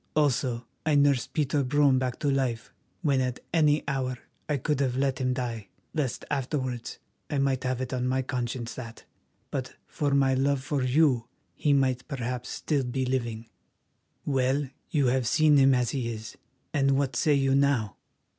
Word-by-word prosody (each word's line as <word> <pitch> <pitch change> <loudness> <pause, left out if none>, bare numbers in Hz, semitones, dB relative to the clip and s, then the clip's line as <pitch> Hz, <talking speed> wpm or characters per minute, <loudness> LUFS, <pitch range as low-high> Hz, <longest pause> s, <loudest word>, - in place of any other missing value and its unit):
Also, 130 -5 +1 0.2
I 155 -1 +2
nursed 140 -4 +3
Peter 145 -1 +1
Brome 140 0 +3
back 130 -1 -2
to 145 - +2
life, 130 -4 -1 0.3
when 140 -4 +3
at 125 -1 -2
any 150 -2 +3
hour 130 -2 -1 0.3
I 150 - +1
could 140 +2 -1
have 130 -2 0
let 135 -1 0
him 130 0 +1
die, 120 -5 -3 0.3
lest 135 -6 -2
afterwards 130 -3 -2 0.3
I 145 - -1
might 135 -1 +1
have 130 0 -1
it 130 0 -4
on 125 0 -1
my 130 +1 +1
conscience 120 -2 -3
that, 115 -3 -9 0.5
but 130 -3 -4
for 145 -2 -1
my 135 -1 +4
love 135 0 +1
for 145 -1 -1
you, 130 -2 +3 0.3
he 150 - 0
might 130 -3 +2
perhaps 125 -3 -4
still 145 -4 -1
be 130 +1 -2
living. 120 -3 -2 0.8
Well, 135 0 +1 0.2
you 145 -6 +2
have 125 -1 +2
seen 155 +2 +5
him 135 -1 +6
as 125 -2 +1
he 125 -4 -2
is, 110 0 -7 0.4
and 135 -2 +3
what 135 -1 0
say 150 -2 +3
you 135 -1 +2
now? 135 -8 +2
130 Hz, 175 wpm, -27 LUFS, 125-140 Hz, 0.8 s, him